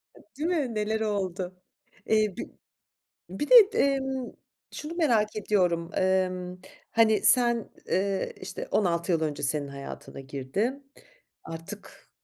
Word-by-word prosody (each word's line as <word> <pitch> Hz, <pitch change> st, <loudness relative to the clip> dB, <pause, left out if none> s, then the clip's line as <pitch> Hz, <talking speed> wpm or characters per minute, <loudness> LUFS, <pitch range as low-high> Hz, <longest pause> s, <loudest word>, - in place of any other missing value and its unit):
E, -, -, -16 dB, 0.2 s
değil 315 Hz, +3 st, -1 dB
mi, 285 Hz, -10 st, 0 dB
neler 215 Hz, +1 st, 0 dB
oldu? 190 Hz, -3 st, -2 dB, 0.5 s
Eee, 215 Hz, -3 st, +2 dB
bir -, -, -5 dB, 0.8 s
bir 195 Hz, +11 st, -3 dB
de -, -, +8 dB, 0.3 s
emm, 265 Hz, -2 st, 0 dB, 0.4 s
şunu 305 Hz, +3 st, -6 dB
merak 230 Hz, -12 st, +2 dB
ediyorum. 180 Hz, -5 st, +1 dB
Emm, 185 Hz, -1 st, 0 dB, 0.3 s
hani, 225 Hz, -1 st, +4 dB
sen, 240 Hz, -2 st, +3 dB, 0.2 s
eee, 195 Hz, +1 st, 0 dB
işte -, -, -6 dB
16 175 Hz, -3 st, +1 dB
yıl 165 Hz, -, +2 dB
önce 150 Hz, -3 st, -2 dB
senin 145 Hz, 0 st, -1 dB
hayatına 140 Hz, 0 st, -8 dB
girdi. 140 Hz, -, -2 dB, 0.6 s
Artık, 165 Hz, 0 st, -10 dB
200 Hz, 125 wpm, -27 LUFS, 175-235 Hz, 0.8 s, de